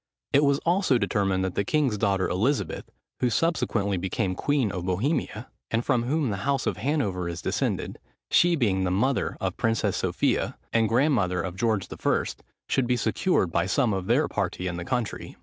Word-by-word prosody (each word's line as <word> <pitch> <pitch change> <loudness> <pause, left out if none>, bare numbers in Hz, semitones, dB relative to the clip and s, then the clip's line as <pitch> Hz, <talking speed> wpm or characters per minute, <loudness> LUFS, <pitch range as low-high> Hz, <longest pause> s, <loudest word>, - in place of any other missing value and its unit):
It 140 +1 +5
was 140 -1 +3
also 175 -6 +3
determined 95 -5 0
that 95 - -2
the 100 - 0
king's 135 0 +1
daughter 100 -3 +1
Elizabeth, 120 +11 -1 0.3
who 125 - +2
subsequently 110 - 0
became 95 +2 -1
queen 135 0 0
of 90 -2 -4
Bohemia, 110 - -1 0.2
and 115 +1 -1
from 120 -4 +1
whom 145 -2 0
the 100 - -2
house 135 +6 -1
of 95 - -1
Hanover 100 - -1
is 85 0 -5
descended, - - -2 0.3
she 175 0 +5
being 100 - +1
the 90 - +1
mother 125 +9 0
of 95 -1 -1
the - - -36
Princess 115 -2 0
Sophia, - - 0 0.2
and 115 -2 +3
grandmother 115 - +2
of 90 -1 -5
George 110 -1 0
I., - - +1 0.4
should 130 -2 +1
be 125 0 +2
secured 110 - +1
by 90 - +1
some 115 +2 +2
of 95 -1 -3
their - - +3
party 90 - -2
in 90 -1 -3
the 85 - -5
country. 125 0 -3
110 Hz, 185 wpm, -26 LUFS, 95-135 Hz, 0.4 s, It